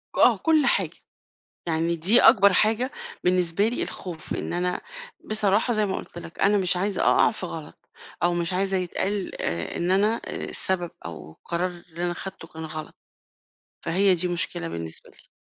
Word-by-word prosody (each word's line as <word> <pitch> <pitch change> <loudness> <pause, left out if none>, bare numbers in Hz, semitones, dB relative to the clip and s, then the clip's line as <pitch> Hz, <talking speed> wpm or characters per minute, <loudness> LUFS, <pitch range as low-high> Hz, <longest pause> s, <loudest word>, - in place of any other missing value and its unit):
ك - - -6
آه، - - +6
كل 315 -3 +3
حاجة، - - +1 0.7
يعني 165 +1 0
دي 190 +9 +5
أكبر 200 -1 +7
حاجة 225 +7 +2 0.3
بالنسبة 180 +2 +2
لي 240 - -2
الخوف 170 -4 -6
إن - - -4
أنا 180 +1 -1 0.4
بصراحة 215 +2 +3
زي 215 -1 +2
ما 190 - -2
قُلت - - -8
لَك 170 -1 -10
أنا 205 +1 +4
مش 180 -2 +2
عايزة 195 +1 -1
أقع - - +4
في 205 -4 -5
غلط، 160 -3 -9 0.3
أو 175 0 +3
مش 175 +1 -1
عايزة 190 +1 +1
يتقال 190 +2 -2
آآ 85 0 -2
إن 175 +1 0
أنا 210 +4 +2
آآ - - -5
السبب، 175 -2 +2
أو 80 -2 -8
القرار 170 - -3
اللي 175 -1 -7
أنا 175 - -1
خدته 175 -2 -7
كان 160 0 -8
غلط، 155 0 -7 0.9
فهي 190 +3 +3
دي 180 +1 0
مشكلة 170 - -2
بالنسبة 80 -1 -6
لي. - - -21
180 Hz, 175 wpm, -25 LUFS, 165-200 Hz, 0.9 s, أكبر